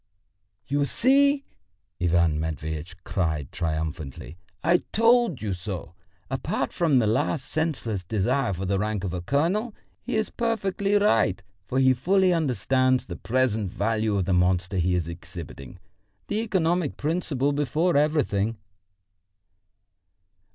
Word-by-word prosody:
"You 145 Hz, +1 st, +1 dB
see!" 280 Hz, -, +3 dB, 0.6 s
Ivan 85 Hz, -3 st, +2 dB
Matveitch 80 Hz, +1 st, -4 dB
cried 80 Hz, -, -2 dB
triumphantly. 80 Hz, -3 st, -4 dB, 0.3 s
"I 170 Hz, +3 st, +5 dB
told 230 Hz, -, +3 dB
you 105 Hz, -3 st, -1 dB
so! 90 Hz, -1 st, -6 dB, 0.3 s
Apart -, -, -2 dB
from 160 Hz, -6 st, +2 dB
this 115 Hz, -4 st, +3 dB
last 130 Hz, +5 st, 0 dB
senseless 125 Hz, -, -2 dB
desire 115 Hz, +6 st, 0 dB
for 95 Hz, +1 st, -3 dB
the 95 Hz, +1 st, 0 dB
rank 105 Hz, -1 st, -2 dB
of 90 Hz, -3 st, -3 dB
a 90 Hz, -, -3 dB
colonel, 175 Hz, -, 0 dB, 0.3 s
he 250 Hz, -, -3 dB
is 220 Hz, -1 st, 0 dB
perfectly 205 Hz, -3 st, 0 dB
right, 110 Hz, -, +3 dB, 0.2 s
for 130 Hz, -, -2 dB
he 130 Hz, -1 st, +5 dB
fully 185 Hz, +8 st, +3 dB
understands 130 Hz, -, +1 dB
the -, -, -6 dB
present 110 Hz, -5 st, 0 dB
value 110 Hz, +1 st, 0 dB
of 95 Hz, -2 st, +1 dB
the 95 Hz, -, +1 dB
monster 90 Hz, +1 st, +1 dB
he 90 Hz, +1 st, +2 dB
is 85 Hz, -2 st, -1 dB
exhibiting. 85 Hz, -2 st, -9 dB, 0.5 s
The 205 Hz, -, 0 dB
economic 180 Hz, -7 st, 0 dB
principle 145 Hz, -3 st, 0 dB
before 150 Hz, +4 st, +1 dB
everything!" 130 Hz, -8 st, +1 dB
120 Hz, 130 wpm, -25 LUFS, -, 0.6 s, I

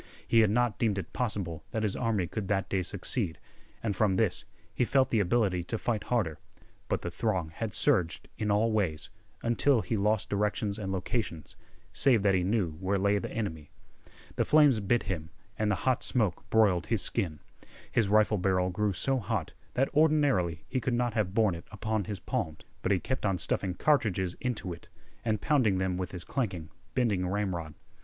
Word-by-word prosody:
He 115 Hz, -, +4 dB
had 110 Hz, -2 st, +5 dB
not 120 Hz, +1 st, +1 dB
deemed 110 Hz, -4 st, +1 dB
it 95 Hz, -, -5 dB
possible 95 Hz, -10 st, -2 dB
that 110 Hz, -, -2 dB
his 105 Hz, -3 st, 0 dB
army 110 Hz, -6 st, 0 dB
could 100 Hz, +3 st, -4 dB
that 95 Hz, -1 st, 0 dB
day 95 Hz, -, +1 dB
succeed, 90 Hz, -, -2 dB, 0.5 s
and 105 Hz, -3 st, -1 dB
from 100 Hz, -1 st, +2 dB
this 95 Hz, -4 st, +1 dB, 0.3 s
he -, -, +1 dB
felt 130 Hz, +2 st, +2 dB
the 115 Hz, -, +3 dB
ability 100 Hz, -2 st, +1 dB
to 115 Hz, -, -2 dB
fight 110 Hz, -1 st, -2 dB
harder. 100 Hz, -11 st, 0 dB, 0.5 s
But -, -, -1 dB
the 85 Hz, -, -3 dB
throng 90 Hz, -4 st, -1 dB
had 110 Hz, +5 st, -3 dB
surged 95 Hz, -, +1 dB
in 105 Hz, -, -2 dB
all 105 Hz, +3 st, +3 dB
ways, 95 Hz, -8 st, -1 dB, 0.3 s
until 120 Hz, +2 st, +3 dB
he 115 Hz, -, -2 dB
lost 105 Hz, +1 st, +1 dB
directions 105 Hz, 0 st, 0 dB
and 95 Hz, -2 st, -3 dB
locations, 95 Hz, -, -3 dB, 0.4 s
save 120 Hz, -7 st, +3 dB
that 100 Hz, -1 st, +4 dB
he 95 Hz, -, +3 dB
knew 95 Hz, -3 st, +1 dB
where 95 Hz, +1 st, 0 dB
lay 100 Hz, +1 st, +2 dB
the -, -, -5 dB
enemy. 80 Hz, -10 st, -4 dB, 0.7 s
The -, -, +3 dB
flames 150 Hz, -6 st, +5 dB
bit 110 Hz, +4 st, +1 dB
him, 85 Hz, -5 st, -4 dB, 0.3 s
and 110 Hz, -1 st, 0 dB
the 100 Hz, -, +2 dB
hot 130 Hz, -2 st, +2 dB
smoke 110 Hz, -9 st, 0 dB
broiled 100 Hz, -6 st, +3 dB
his 110 Hz, -5 st, +2 dB
skin. 75 Hz, -5 st, -1 dB, 0.5 s
His 110 Hz, -4 st, +2 dB
rifle 105 Hz, 0 st, +4 dB
barrel 90 Hz, 0 st, +1 dB
grew 105 Hz, +2 st, 0 dB
so 135 Hz, +7 st, +1 dB
hot 110 Hz, -9 st, -3 dB, 0.2 s
that 135 Hz, +2 st, +1 dB
ordinarily 145 Hz, -, +3 dB
he 130 Hz, 0 st, -1 dB
could 125 Hz, -1 st, 0 dB
not 120 Hz, -1 st, 0 dB
have 105 Hz, -4 st, -1 dB
borne 110 Hz, -4 st, +3 dB
it 85 Hz, -, -9 dB
upon 110 Hz, -1 st, -2 dB
his 100 Hz, 0 st, -5 dB
palms; 100 Hz, -, -3 dB, 0.2 s
but 95 Hz, -, 0 dB
he 95 Hz, -, +3 dB
kept 130 Hz, +6 st, -3 dB
on 95 Hz, -3 st, +1 dB
stuffing 90 Hz, 0 st, -1 dB
cartridges 95 Hz, -, +1 dB
into 110 Hz, -8 st, -2 dB
it, 85 Hz, -, -13 dB, 0.4 s
and 110 Hz, -3 st, 0 dB
pounding 125 Hz, -10 st, +3 dB
them 95 Hz, -1 st, 0 dB
with 90 Hz, 0 st, -3 dB
his 90 Hz, -2 st, -5 dB
clanking, 90 Hz, -, -3 dB, 0.2 s
bending 105 Hz, -8 st, +1 dB
ramrod. 90 Hz, -5 st, -2 dB
105 Hz, 190 wpm, -29 LUFS, 90-115 Hz, 0.7 s, had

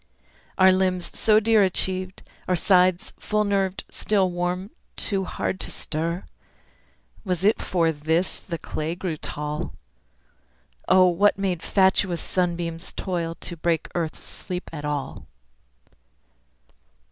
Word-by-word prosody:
Are 190 Hz, 0 st, +7 dB
limbs, 185 Hz, -1 st, 0 dB
so 215 Hz, -1 st, +4 dB
dear 220 Hz, 0 st, +4 dB
achieved, 185 Hz, -1 st, +1 dB, 0.2 s
are 185 Hz, -, +2 dB
sides, 180 Hz, 0 st, +3 dB
Full 210 Hz, 0 st, 0 dB
nerved 195 Hz, -2 st, 0 dB
still 195 Hz, -3 st, +1 dB
warm 180 Hz, +3 st, -2 dB, 0.2 s
too 195 Hz, -2 st, 0 dB
hard 185 Hz, -, -3 dB
to -, -, -1 dB
stir? 165 Hz, +4 st, -2 dB, 1.0 s
Was 180 Hz, -3 st, -2 dB
it 210 Hz, +3 st, +3 dB
for 165 Hz, -3 st, +1 dB
this 160 Hz, +4 st, 0 dB
the 170 Hz, -3 st, -5 dB
clay 160 Hz, +1 st, -4 dB
grew 180 Hz, -3 st, -3 dB
tall? 150 Hz, 0 st, -4 dB, 1.1 s
O 185 Hz, 0 st, +6 dB
what 190 Hz, +4 st, +3 dB
made 190 Hz, -4 st, -1 dB
fatuous 190 Hz, -2 st, +2 dB
sunbeams 170 Hz, -2 st, -2 dB
toil 170 Hz, -3 st, -3 dB
To 175 Hz, -, -2 dB
break 165 Hz, 0 st, -1 dB
the -, -, -6 dB
earth's 160 Hz, -2 st, -4 dB
sleep 180 Hz, -1 st, -6 dB
at 150 Hz, -2 st, -5 dB
all? 145 Hz, -2 st, -4 dB
180 Hz, 125 wpm, -24 LUFS, 165-190 Hz, 1.1 s, Are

